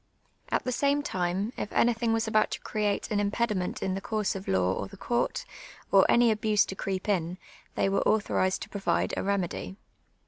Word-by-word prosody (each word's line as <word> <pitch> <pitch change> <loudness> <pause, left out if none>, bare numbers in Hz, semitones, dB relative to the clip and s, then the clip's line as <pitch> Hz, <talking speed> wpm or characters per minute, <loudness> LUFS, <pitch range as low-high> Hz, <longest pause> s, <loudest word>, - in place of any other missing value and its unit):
At - - 0
the 255 - -2
same 280 +3 +1
time, 190 -1 -1
if - - -4
anything 235 -1 +2
was 225 0 +1
about 215 -1 +3
to - - -5
create 210 +1 -1
an 210 - +1
impediment 205 -2 -1
in 190 - 0
the 195 - -3
course 215 -2 -1
of 195 0 -7
law 95 -1 +2
or - - -4
the 200 0 -13
court, 240 +4 -1 0.5
or - - +6
any 235 -1 +5
abuse 215 -1 +2
to 190 - -6
creep 190 0 -3
in, 180 -3 0 0.4
they - - +2
were 195 - +1
autho 215 0 +1
rized 185 0 +1
to - - -10
provide 200 -1 0
a - - -1
remedy. 190 -1 -2
205 Hz, 200 wpm, -28 LUFS, 190-225 Hz, 0.5 s, or